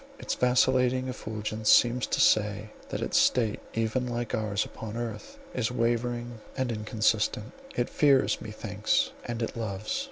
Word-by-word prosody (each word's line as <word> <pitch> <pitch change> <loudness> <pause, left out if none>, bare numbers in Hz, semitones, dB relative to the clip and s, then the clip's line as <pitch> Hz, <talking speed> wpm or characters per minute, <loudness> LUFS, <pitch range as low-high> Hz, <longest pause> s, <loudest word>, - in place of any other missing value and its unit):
Its - - -3
vacillating 125 0 +2
effulgence 110 -2 -3
seems 120 +1 +5
to - - -1
say 105 0 +3 0.2
that - - -3
its - - +2
state, 115 -5 +2 0.2
even 115 +3 0
like 120 -1 -3
ours 105 -1 0
upon 110 0 -7
earth, 115 -3 -6 0.2
is 120 -3 0
wavering 120 -1 -1 0.2
and 130 -2 0
inconstant; 110 +1 0 0.2
it 120 - 0
fears, 140 -3 +3
methinks, - - -1
and 120 -1 -3
it - - -4
loves." 110 - -3
115 Hz, 140 wpm, -28 LUFS, 110-125 Hz, 0.2 s, seems